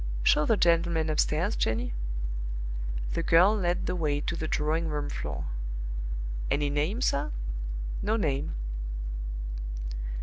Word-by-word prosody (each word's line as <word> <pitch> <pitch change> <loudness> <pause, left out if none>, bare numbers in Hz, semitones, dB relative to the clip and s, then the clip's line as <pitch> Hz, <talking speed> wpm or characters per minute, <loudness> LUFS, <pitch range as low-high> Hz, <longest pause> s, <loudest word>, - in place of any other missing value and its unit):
"Show 150 - +5
the 225 - +4
gentleman 170 -2 +3
upstairs, 160 +6 +2
Jenny." 110 - 0 1.2
The - - +1
girl 180 +6 +6
led 175 -4 +1
the - - 0
way 150 -4 +1
to 170 - -1
the 160 -1 -2
drawing 155 +2 +1
room 150 -2 -1
floor. - - -3 1.0
"Any 145 0 +2
name, 155 - +1
sir?" 140 - +2 0.7
"No 215 +2 +2
name." 140 - 0
160 Hz, 115 wpm, -29 LUFS, 150-175 Hz, 1.2 s, girl